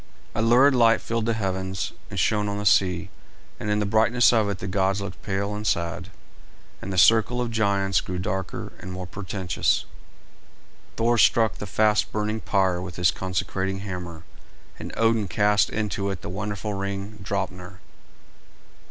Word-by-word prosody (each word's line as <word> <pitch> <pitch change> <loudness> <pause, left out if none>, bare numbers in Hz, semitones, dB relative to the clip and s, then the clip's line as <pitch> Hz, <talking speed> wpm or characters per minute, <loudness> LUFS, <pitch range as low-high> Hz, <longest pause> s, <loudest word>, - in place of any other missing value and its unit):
A - - -1
lurid 125 +5 +5
light 115 -2 +5
filled 115 -1 -2
the 115 - +1
heavens 95 -2 -3 0.2
and - - -7
shone 105 -1 +1
on 100 - -3
the 105 - -4
sea, 90 -2 +2 0.5
and 105 - -4
in 105 - +2
the 105 - 0
brightness 115 +4 +4
of 110 -3 +2
it 100 - -2
the - - -7
gods 95 +1 0
looked 95 -4 -7
pale 100 +1 -2
and 105 +1 -4
sad, 85 +2 -1 0.7
and 95 - -5
the 95 - -3
circle 115 +5 +5
of 120 -1 -2
giants 100 -3 +1
grew 90 - -5
darker 95 0 -4
and 95 - -8
more 90 0 -5
portentous. 95 -2 -1 1.1
Thor 115 +1 +2
struck 110 -2 +4
the 105 - -5
fast 105 +2 +2
burning 105 +1 -2
pyre 95 -4 +1
with 90 -2 -7
his 90 0 +3
consecrating 95 +1 -3
hammer, 90 -4 -6 0.6
and - - -6
Odin 115 -2 +2
cast 105 +2 +2
into 105 -2 -2
it 95 -4 -5
the - - -5
wonderful 105 +2 -4
ring 100 +2 -4
Draupner. 95 -1 -4
100 Hz, 165 wpm, -25 LUFS, 95-110 Hz, 1.1 s, lurid